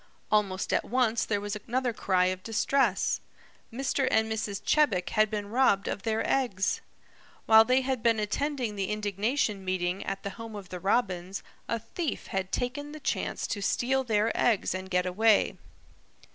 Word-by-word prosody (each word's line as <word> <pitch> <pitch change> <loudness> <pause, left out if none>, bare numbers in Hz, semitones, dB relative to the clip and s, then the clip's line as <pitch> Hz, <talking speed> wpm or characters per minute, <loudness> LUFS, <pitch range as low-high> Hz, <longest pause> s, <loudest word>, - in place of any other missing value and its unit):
Almost 200 -3 +1
at - - +2
once 235 -2 +1
there 205 -2 0
was 205 +1 -4
another 240 +4 -2
cry 185 -4 +2
of 185 - -10
distress. 225 0 +1 0.5
Mr. 265 +2 0
and 220 0 +2
Mrs. 215 -3 -2
Chebec 215 -13 +2
had 215 -1 +3
been 205 -1 -4
robbed 230 -5 +3
of - - -3
their 220 +1 -1
eggs! 235 -8 0 0.6
While 220 0 +8
they 255 +2 +3
had 260 -2 -2
been 230 -1 +3
attending 245 +1 -1
the 195 -2 -2
indignation 210 +1 -1
meeting 185 0 -1
at 195 0 -4
the 200 - -3
home 230 +1 -9
of 195 -3 -8
the 180 - -6
Robins, 190 -2 -1 0.2
a 230 - 0
thief 270 - -4
had 190 -1 -2
taken 290 +4 -3
the 310 - -8
chance - - -2
to 205 - -3
steal 265 +6 +1
their 220 -2 +1
eggs 225 -5 +2
and 185 0 -5
get 180 -1 +1
away. 210 +4 +3
215 Hz, 170 wpm, -28 LUFS, 195-245 Hz, 0.6 s, While